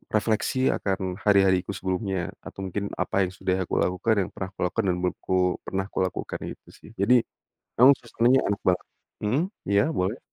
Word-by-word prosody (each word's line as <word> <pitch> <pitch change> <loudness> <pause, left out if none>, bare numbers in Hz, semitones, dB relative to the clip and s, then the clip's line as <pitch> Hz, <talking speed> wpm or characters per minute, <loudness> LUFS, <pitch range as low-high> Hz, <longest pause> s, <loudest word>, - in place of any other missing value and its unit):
refleksi 110 +4 +1
akan 95 -1 -2
hari-hariku 95 -1 +4
sebelumnya 95 -1 -2
atau 95 - -7
mungkin 100 +2 -2
apa 95 -1 +1
yang - - -8
sudah 95 -1 0
aku - - -2
lakukan, 90 +5 +1
yang - - -11
pernah 95 - -5
kulakukan 100 +5 -1
dan 90 - +2
menurutku 90 0 0
pernah 95 0 -1
kulakukan 95 -1 -2 0.2
itu - - -52
sih. - - -16
Jadi, 120 +6 +4 0.6
emang 135 +3 +9
suasananya 120 +1 +2
enak 100 - -3
banget. 90 -1 +2 0.4
Mmm? 125 +10 +2 0.3
Iya 100 0 +4
boleh. 95 +7 -1
95 Hz, 165 wpm, -26 LUFS, 90-110 Hz, 0.6 s, emang